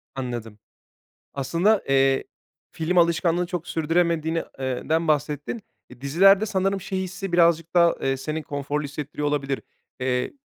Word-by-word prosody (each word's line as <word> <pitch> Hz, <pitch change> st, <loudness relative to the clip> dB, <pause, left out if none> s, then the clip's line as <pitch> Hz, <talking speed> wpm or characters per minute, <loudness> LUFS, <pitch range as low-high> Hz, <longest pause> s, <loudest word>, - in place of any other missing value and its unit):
Anladım. 120 Hz, -5 st, -5 dB, 0.8 s
Aslında, 170 Hz, +10 st, +2 dB
eee, 135 Hz, 0 st, +3 dB, 0.5 s
film 165 Hz, +2 st, 0 dB
alışkanlığını 170 Hz, +1 st, +2 dB
çok 175 Hz, -2 st, -5 dB
sürdüremediğin, 165 Hz, 0 st, +1 dB, 0.3 s
ııı, 130 Hz, -2 st, -3 dB
den 160 Hz, +1 st, +1 dB
bahsettin. 150 Hz, -, -1 dB, 0.3 s
Eee, 125 Hz, -1 st, -14 dB
dizilerde 195 Hz, +9 st, +5 dB
sanırım 195 Hz, -1 st, 0 dB
şey 190 Hz, 0 st, -3 dB
hissi 190 Hz, 0 st, -5 dB
birazcık 170 Hz, -1 st, +3 dB
daha, 170 Hz, -1 st, +5 dB
eee, 135 Hz, 0 st, 0 dB
seni 155 Hz, +4 st, -4 dB
konforlu 145 Hz, +1 st, -3 dB
hissettiriyor 145 Hz, +1 st, -4 dB
olabilir. 140 Hz, -2 st, -1 dB, 0.4 s
Eee, 125 Hz, -1 st, -1 dB
160 Hz, 130 wpm, -24 LUFS, 140-175 Hz, 0.8 s, dizilerde